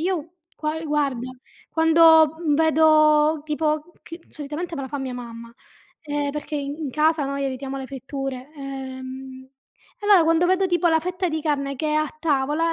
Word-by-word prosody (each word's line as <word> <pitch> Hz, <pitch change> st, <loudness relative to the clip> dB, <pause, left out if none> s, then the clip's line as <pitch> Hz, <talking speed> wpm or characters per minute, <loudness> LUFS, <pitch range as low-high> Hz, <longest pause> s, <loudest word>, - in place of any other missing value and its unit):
io 335 Hz, -1 st, -2 dB, 0.2 s
gua 305 Hz, +1 st, -2 dB
ehm, 325 Hz, -, -7 dB
guarda: 275 Hz, -5 st, -1 dB, 0.4 s
quando, 320 Hz, -1 st, +5 dB
mhmm, 315 Hz, -4 st, +1 dB
vedo 310 Hz, -1 st, +4 dB
tipo 305 Hz, +2 st, -1 dB
che 335 Hz, +1 st, -10 dB
solitamente 305 Hz, +4 st, -6 dB
me 275 Hz, -, -4 dB
la 265 Hz, -, -6 dB
fa 285 Hz, +1 st, -4 dB
mia 260 Hz, -2 st, -4 dB
mamma, 235 Hz, -1 st, -9 dB, 0.5 s
ehm, 290 Hz, -2 st, -2 dB
perché 300 Hz, +1 st, -5 dB
i 285 Hz, -, -3 dB
in 285 Hz, 0 st, -5 dB
casa 310 Hz, +1 st, +2 dB
noi 275 Hz, 0 st, -3 dB
evitiamo 270 Hz, 0 st, -4 dB
le 265 Hz, -, -6 dB
fritture. 270 Hz, 0 st, -6 dB
Ehm, 260 Hz, -1 st, -8 dB, 0.5 s
e 410 Hz, -, -5 dB
allora 400 Hz, -4 st, +7 dB
quando 330 Hz, +2 st, +3 dB
vedo 375 Hz, +1 st, +2 dB
tipo 350 Hz, -1 st, +1 dB
la 320 Hz, -1 st, +3 dB
fetta 360 Hz, +2 st, -2 dB
di 315 Hz, -1 st, -3 dB
carne 280 Hz, -2 st, -1 dB
che 305 Hz, +4 st, -3 dB
è 300 Hz, -, 0 dB
a 310 Hz, 0 st, +2 dB
tavola, 305 Hz, +2 st, +1 dB
300 Hz, 180 wpm, -23 LUFS, 275-320 Hz, 0.5 s, allora